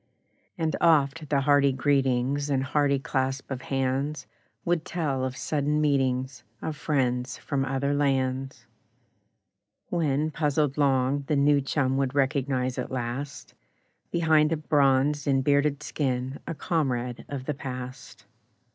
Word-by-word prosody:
And 160 -2 0
oft 155 -2 +3
the 140 -2 +2
hearty 140 0 +4
greetings 135 +1 +1
And 135 -2 +1
hearty 140 +1 +2
clasp 135 0 -2
of 130 -1 -3
hands 135 +3 -1 0.4
Would 175 -2 +1
tell 150 -7 -2
of 130 0 -3
sudden 150 +1 0
meetings 130 -4 0 0.2
Of 160 - -4
friends 130 -4 -1
from 135 -1 -2
other 135 +1 -1
lands; 135 -2 -1 1.2
When, 155 -2 0
puzzled 150 -2 0
long, 140 -1 +2
the 150 - +1
new 140 0 +4
chum 135 -1 0
Would 135 0 -1
recognise 135 -2 0
at - - -3
last, 130 +3 -5 0.6
Behind 160 -2 +3
a 165 - +1
bronzed 145 -1 +2
and 135 -1 +2
bearded 145 +1 +2
skin, 130 -2 -2
A 165 - -3
comrade 125 -6 -1
of 135 -2 -5
the 150 - -1
past. 130 -2 -8
140 Hz, 130 wpm, -27 LUFS, 130-150 Hz, 1.2 s, hearty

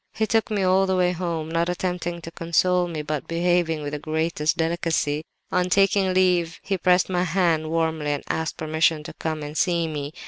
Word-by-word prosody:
He 220 - +1
took 225 0 +1
me 205 -3 0
all 190 +1 +3
the 190 - +1
way 180 -1 +2
home; 170 -3 -3
not 170 +1 0
attempting 180 -1 -3
to 165 - -8
console 175 +2 +1
me, 160 -3 -4
but 150 -1 -4
behaving 170 -2 +1
with 145 0 -5
the 150 - -3
greatest 155 0 -1
delicacy. 160 -3 0 0.3
On 180 0 +1
taking 195 0 +3
leave 180 -3 +2
he 195 -2 -2
pressed 180 +1 +3
my 180 -1 0
hand 165 -3 +1
warmly 160 -2 0
and 145 - -4
asked 160 0 -2
permission 155 0 +1
to 155 - -8
come 155 -2 -4
and 150 +1 -7
see 170 -1 +1
me. 145 -2 -4
170 Hz, 200 wpm, -24 LUFS, 155-180 Hz, 0.3 s, all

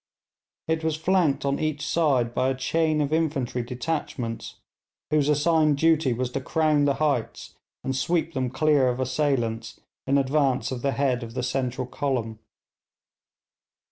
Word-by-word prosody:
It 160 0 0
was 160 -1 0
flanked 160 -3 +1
on 140 0 0
each 155 -2 -2
side 135 -8 +1
by 130 - +1
a 135 - -1
chain 155 +3 +1
of 145 +1 -1
infantry 145 -6 0
detachments, 125 -2 -4 0.6
whose 150 -1 +2
assigned 150 0 +3
duty 160 -3 +3
was 125 +1 -2
to 135 - -3
crown 150 +1 +2
the 140 -1 +2
heights 145 -7 -2 0.3
and 130 - -2
sweep 165 +6 0
them 130 -3 -1
clear 140 0 +3
of 125 +1 -2
assailants 130 -4 -1 0.3
in 140 +1 +3
advance 135 -1 +1
of 125 -2 -4
the 140 +1 0
head 130 -3 0
of 115 0 -8
the - - -2
central 125 0 -2
column. 120 -5 -3
140 Hz, 150 wpm, -25 LUFS, 125-155 Hz, 0.6 s, assigned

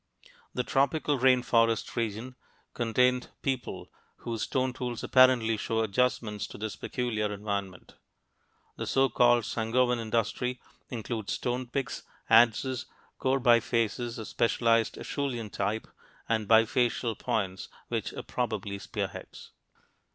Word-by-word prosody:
The 125 - 0
tropical 140 +2 +1
rain 130 -1 +4
forest 115 -2 +2
region 115 +2 -3 0.4
contained 125 +2 +1
people 130 -3 -3 0.2
whose 115 -2 -5
stone 130 -1 0
tools 120 -2 -4
apparently 125 -4 +5
show 115 +1 -1
adjustment 110 -1 0
to - - -9
this 110 0 -4
peculiar 110 -4 -2
environment; 100 -3 -4 0.8
the - - -4
so 135 0 +3
called 120 0 +4
Sangoan 120 +3 +1
industry 115 +3 -1 0.3
includes 115 -3 -4
stone 125 0 -2
picks, 130 +1 -3 0.3
adzes, 120 +3 +4 0.3
core 135 +1 +1
bifaces 120 -1 +2
of 110 - -6
specialized 115 -1 +2
Acheulean 120 -7 -3
type, 105 +3 -2 0.4
and 110 -2 0
bifacial 115 +1 +3
points 100 -6 -2 0.2
which - - -2
were - - -7
probably 105 -5 -3
spearheads. - - -6
115 Hz, 115 wpm, -29 LUFS, 110-125 Hz, 0.8 s, apparently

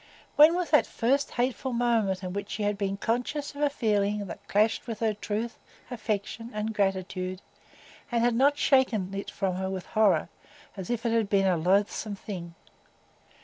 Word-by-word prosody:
When 310 +3 +7
was 360 -1 -2
that 300 - +5
first 270 +5 +1
hateful 250 +1 -1
moment 225 -6 +1
in 180 -1 -4
which 200 0 -4
she 210 - -3
had 205 0 +1
been 195 -1 -2
conscious 250 +8 -2
of 285 - -7
a 295 - +4
feeling 210 -5 0
that 170 - -9
clashed 215 +4 +1
with 225 -2 -5
her 220 -2 +1
truth, 215 +3 -4 0.3
affection, 225 0 -3
and 215 +1 -2
gratitude, 185 -2 -1 0.7
and 235 -1 +1
had 240 0 +3
not 280 +5 +3
shaken 230 -11 +2
it 200 0 -4
from 190 -2 -2
her 190 0 -2
with 190 -1 -4
horror, 215 -2 +2 0.5
as 190 -3 -7
if 240 -1 -2
it 230 - +2
had 225 -3 +1
been 195 -1 +3
a 185 -2 +3
loathsome 200 +5 +1
thing? 175 -5 -7
210 Hz, 180 wpm, -28 LUFS, 195-240 Hz, 0.7 s, When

